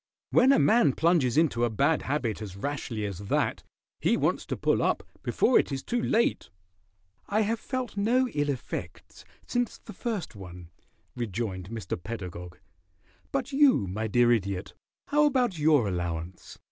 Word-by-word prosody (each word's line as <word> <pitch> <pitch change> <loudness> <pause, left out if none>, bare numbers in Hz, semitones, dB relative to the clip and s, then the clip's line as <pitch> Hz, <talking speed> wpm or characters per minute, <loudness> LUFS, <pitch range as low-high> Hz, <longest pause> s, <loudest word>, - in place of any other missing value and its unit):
"When 255 +2 +5
a 275 - +5
man 210 - +4
plunges 155 -6 +2
into 150 -7 +2
a 120 - +3
bad 140 +8 +2
habit 130 -7 -2
as 100 -4 -7
rashly 115 -2 -3
as 100 -3 -5
that, 100 - -1 0.4
he - - +2
wants - - 0
to - - -3
pull - - +1
up - - +1 0.2
before - - +3
it - - -1
is 135 -1 -3
too 240 0 -1
late." 230 0 +1 0.8
"I 210 +2 +1
have 220 +2 0
felt 255 -4 -4
no 240 +6 +2
ill 145 -5 -1
effects 135 -3 -6 0.2
since 245 -2 -1
the 215 - -12
first 215 - -4
one," 90 -3 -10 0.4
rejoined 105 -5 -4
Mr. 110 -6 -5
Pedagog. 90 -4 -7 0.7
"But 275 0 -2
you, 275 - +4
my 105 +4 -3
dear 120 +2 +4
Idiot, 100 -4 -1 0.4
how 295 +1 +4
about 250 - +1
your 150 -7 +4
allowance? 85 -1 -4
130 Hz, 160 wpm, -28 LUFS, -, 0.8 s, When